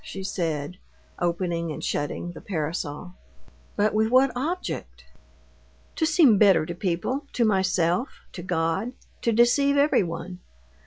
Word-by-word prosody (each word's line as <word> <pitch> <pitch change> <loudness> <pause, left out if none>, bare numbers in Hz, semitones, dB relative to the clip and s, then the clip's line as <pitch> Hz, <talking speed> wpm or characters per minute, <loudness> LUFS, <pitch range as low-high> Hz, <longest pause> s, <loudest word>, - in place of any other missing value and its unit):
she 195 - -7
said, 165 -4 -3 0.4
opening 170 -1 -1
and - - -7
shutting 145 +4 -2
the 175 - -11
parasol. 160 -1 -4 0.6
"But 210 0 +1
with 220 +1 +2
what 260 +2 +4
object?" 245 - -4 0.9
"To 320 - +2
seem 310 - +5
better 195 -7 +5
to 170 - -5
people, 190 - -2
to 235 - +2
myself, 190 +1 +1 0.2
to 180 - -7
God; 175 +6 -1 0.3
to 235 - +1
deceive 260 +5 +3
everyone. 180 - 0
185 Hz, 125 wpm, -25 LUFS, 170-240 Hz, 0.9 s, seem